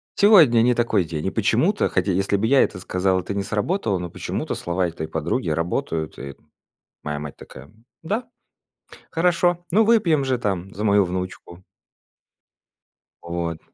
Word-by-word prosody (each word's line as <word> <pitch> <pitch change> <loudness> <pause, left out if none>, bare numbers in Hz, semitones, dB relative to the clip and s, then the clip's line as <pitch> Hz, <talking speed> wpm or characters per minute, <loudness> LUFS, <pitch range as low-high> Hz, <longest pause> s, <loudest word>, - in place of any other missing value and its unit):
Сегодня 165 - +6
не 125 +2 +4
такой 115 -5 +1
день". 80 -2 -5
И - - -1
почему-то, - - +1
хотя, 100 - 0
если 95 +2 0
бы 110 +3 0
я 135 +2 +5
это 90 - -3
сказал, 95 0 0
это 90 +2 -5
не 100 - -1
сработало, 105 - -1
но 90 0 -5
почему-то - - -4
слова 90 +1 -1
этой 80 -2 -6
подруги 80 +6 -2
работают. 80 0 -2
И 70 0 -8 0.7
моя 75 0 -3
мать 75 -1 -8
такая: 70 +2 -13 0.3
"Да? 215 +9 -3 0.8
Хорошо, 175 +1 +1
ну 215 +6 +4
выпьем 205 -10 +3
же 130 -1 0
там 95 -4 -3
за 105 - -5
мою 100 -2 +4
внучку!" 90 0 -6 1.6
Вот. 85 -1 -4
95 Hz, 155 wpm, -22 LUFS, 85-130 Hz, 1.6 s, Сегодня